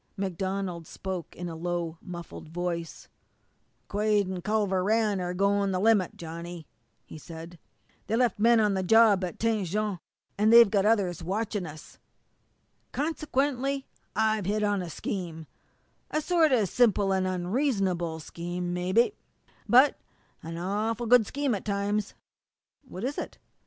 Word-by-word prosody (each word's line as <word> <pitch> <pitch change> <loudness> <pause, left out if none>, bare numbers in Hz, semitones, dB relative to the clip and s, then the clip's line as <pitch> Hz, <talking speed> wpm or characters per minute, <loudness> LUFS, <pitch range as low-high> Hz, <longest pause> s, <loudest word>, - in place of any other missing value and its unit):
MacDonald 190 -2 -3
spoke 185 -3 -6
in 175 - -5
a 165 - -6
low, 170 -1 -3
muffled 175 -3 -9
voice: 170 -1 -4 0.8
"Quade 210 -1 +1
an' 185 -1 -4
Culver 205 -2 +1
Rann 210 -1 +1
are 180 0 -3
goin' 200 +1 +2
the 185 - 0
limit, 205 -3 +2
Johnny," 170 0 -7 0.4
he 155 - -10
said. 165 +2 -10 0.5
"They 220 - 0
left 240 -3 +1
men 230 +1 +5
on 210 -2 +3
the 190 - 0
job 210 0 +5
at 180 - -4
Tête 220 -3 0
Jaune, 205 +1 -2 0.4
and 215 +1 +4
they've 230 -3 +8
got 200 -1 +3
others 200 -6 +1
watching 200 0 -2
us. 155 0 -12 0.9
Consequently, 275 -3 -1 0.3
I've 220 -3 +1
hit 210 +1 0
on 205 -2 +1
a 175 - -5
scheme 165 -1 -5 0.6
a 305 - 0
sort 325 -1 +3
of 225 -6 +3
simple 205 -3 +3
and 190 -1 +1
unreasonable 185 - 0
scheme, 175 +3 -4
mebby, 185 - +2 0.6
but 260 +4 +6 0.4
an 165 +1 -6
awful 210 +6 -1
good 230 -2 +5
scheme 280 -2 -1
at 200 - -3
times." 205 0 -1 0.7
"What 185 -2 -8
is 270 +4 -2
it?" - - -6
200 Hz, 145 wpm, -28 LUFS, 175-220 Hz, 0.9 s, they've